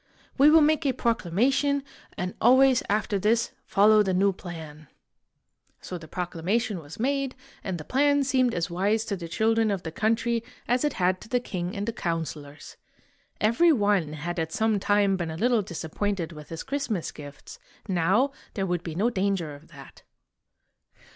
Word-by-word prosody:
We 280 +3 +6
will 320 +1 +7
make 310 +1 +2
a 265 - +2
proclamation, 255 - +1 0.3
and 185 0 -3
always 260 +1 +5
after 205 -1 0
this 225 +4 +1 0.2
follow 215 +1 +5
the 190 -3 0
new 195 +1 +3
plan." 160 -5 -9 0.9
So 180 - -7
the 160 - -12
proclamation 185 +5 -2
was 155 +3 -11
made, 275 +1 -1 0.3
and 190 -2 -3
the 155 - -8
plan 285 +1 +2
seemed 255 -3 +1
as 170 - -1
wise 200 +5 0
to 205 - -2
the 170 -3 -7
children 225 +5 +1
of 195 -3 -2
the 160 - -5
country 230 +5 0 0.2
as 245 +2 +1
it 295 -2 +1
had 185 0 0
to - - -12
the 245 - +2
king 185 -4 -5
and 200 0 -3
the 230 - -1
counselors. 160 - -5 0.6
Every 235 +11 +4
one 205 - +1
had 170 +3 -4
at 160 0 -2
some 220 +2 +1
time 200 -1 +2
been 175 -2 -3
a 160 - -5
little 235 +3 +2
disappointed 175 0 -3
with 150 -2 -11
his 165 0 -6
Christmas 270 - -3
gifts; 145 -1 -11 0.3
now 190 +9 +2 0.2
there 195 - -1
would 175 -2 -1
be 165 -2 -6
no 220 +7 +1
danger 190 -7 -1
of 145 +3 -14
that. - - -14
200 Hz, 175 wpm, -26 LUFS, 170-235 Hz, 0.9 s, will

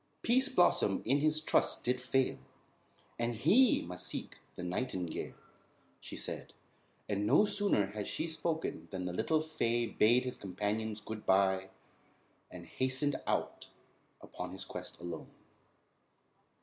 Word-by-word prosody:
"Pease 260 +4 +4
Blossom 175 - +3
in 135 +5 +3
his 155 +1 +3
trust 155 - +1
did 125 +1 0
fail; 130 - +1 0.8
And 120 0 0
he 210 - +5
must 90 +1 -5
seek - - -5 0.2
the - - -6
nightingale," 90 -2 -3 0.6
she - - -8
said; - - -5 0.5
and 105 0 0
no 210 - +6
sooner 205 - +2
had 105 +1 -5
she - - -2
spoken 160 0 -2
than 95 -2 -4
the 90 - -3
little 155 - +1
fay 120 -7 0
bade 115 +2 +4
his 125 - -4
companions 105 +3 -2
good 105 0 -7
bye 95 0 +3 0.8
and 90 -2 -10
hastened 130 - 0
out - - -1 0.5
upon - - -7
his - - -5
quest - - -7
alone. 85 0 -6
115 Hz, 135 wpm, -33 LUFS, 95-155 Hz, 0.8 s, no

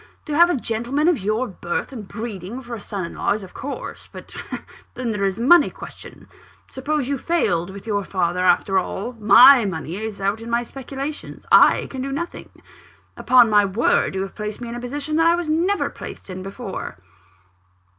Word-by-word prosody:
To 300 - -4
have 345 +3 +6
a 350 - +1
gentleman 245 +5 -1
of 345 -5 +3
your 215 +6 -1
birth 175 +2 -4
and 215 -6 -8
breeding 220 0 -6
for 240 -1 -8
a 230 - -5
son 200 -3 -5
in - - -8
law, - - 0
is 210 0 -5
of 185 - -12
course 280 +2 -7
but - - -11 0.6
then 245 -2 -2
there 205 -2 -1
is 195 -1 0
the 230 - -4
money 345 +7 +6
question. - - -11 0.4
Suppose 280 0 -2
you 280 -1 -2
failed 180 - 0
with 195 +2 -10
your 205 -2 -1
father 180 -2 -1
after 190 +1 +3
all 200 +6 -4
my 235 +5 +8
money 175 -3 -4
is 215 -1 -5
out 200 +3 -1
in 230 - -8
my 235 +1 +1
speculations 275 +4 -7
I - - +6
can 265 - -6
do 275 +1 -3
nothing. 340 +5 -5 0.7
Upon 245 -1 +5
my 205 -1 +6
word, 200 -1 +1
you 190 - -1
have 195 - -7
placed 210 0 -5
me 240 -1 -6
in 235 - -6
a - - -5
position 285 +5 -3
that 325 0 +4
I 340 - +5
never 335 +6 +1
was - - -18
placed - - -9
in 185 0 -6
before." 195 - -6
230 Hz, 200 wpm, -22 LUFS, 195-275 Hz, 0.7 s, my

